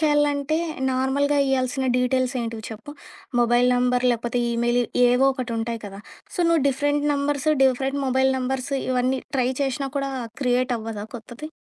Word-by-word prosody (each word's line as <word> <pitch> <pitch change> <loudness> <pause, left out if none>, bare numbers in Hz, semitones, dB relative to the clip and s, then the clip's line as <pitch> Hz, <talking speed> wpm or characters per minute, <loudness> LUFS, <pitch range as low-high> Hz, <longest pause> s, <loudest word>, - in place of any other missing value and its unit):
చేయాలంటే 295 0 +2 0.4
నార్మల్‌గా 280 +3 +1
ఇయ్యాల్సిన 265 0 0
డీటెయిల్సేంటివి 250 -3 -1
చెప్పు? 220 +6 -9 0.5
మొబైల్ 240 +1 +4
నంబర్ 250 0 +1
లేకపోతే 240 +1 -1
ఈమెయిలు, 240 +1 +1 0.3
ఏవో 250 +2 +3
ఒకటి 255 -3 -4
ఉంటాయి 230 0 -3
కదా! 195 0 -9 0.3
సో - - -2
నువ్వు 330 -4 +3
different 290 +2 0
numbers, 280 +1 -1 0.2
different 265 +2 +1
mobile 265 +1 +2
numbers 260 +1 -3 0.2
ఇవన్నీ 255 +1 +1 0.2
ట్రై 250 -1 +2
చేషినా 275 +1 -2
కూడా 275 -1 -1 0.3
క్రియేట్ 250 0 +1
అవ్వదా 220 -2 -6
కొత్తది. 240 +7 -9
255 Hz, 140 wpm, -23 LUFS, 245-280 Hz, 0.5 s, మొబైల్